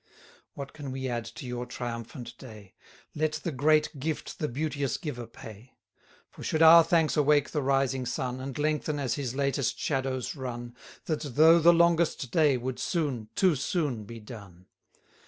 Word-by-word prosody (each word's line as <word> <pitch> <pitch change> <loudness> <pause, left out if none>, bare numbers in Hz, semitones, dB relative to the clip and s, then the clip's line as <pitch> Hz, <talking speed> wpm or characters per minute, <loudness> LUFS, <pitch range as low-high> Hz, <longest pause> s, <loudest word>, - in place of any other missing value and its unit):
What 140 -1 -7
can 145 -3 -7
we 130 0 -4
add 120 -2 -3
to 115 +3 -9
your 125 0 -4
triumphant 120 0 -6
day? 110 -6 -12 0.4
Let 155 0 0
the 170 - -3
great 150 +1 +2
gift 155 +3 -4
the 150 - -1
beauteous 140 0 -2
giver 125 -7 -6
pay. 110 +1 -13 0.6
For - - -13
should 160 +1 +1
our 165 +1 +9
thanks 165 -2 +2
awake 150 -1 +3
the 150 - -1
rising 135 -1 +1
sun, 125 +1 -3
And 130 0 -6
lengthen, 150 0 -1
as 130 -5 -1
his 130 -3 -3
latest 140 -2 0
shadows 130 -2 -2
run, 120 -3 -6 0.3
That, 155 -2 -2
though 155 +4 +5
the 170 +1 +7
longest 170 -6 +2
day, 150 -5 +3
would 125 +1 -4
soon, 145 - -2
too 185 -5 +3
soon 140 - -2
be 115 +2 -9
done. 100 -5 -12
135 Hz, 165 wpm, -28 LUFS, 120-155 Hz, 0.6 s, our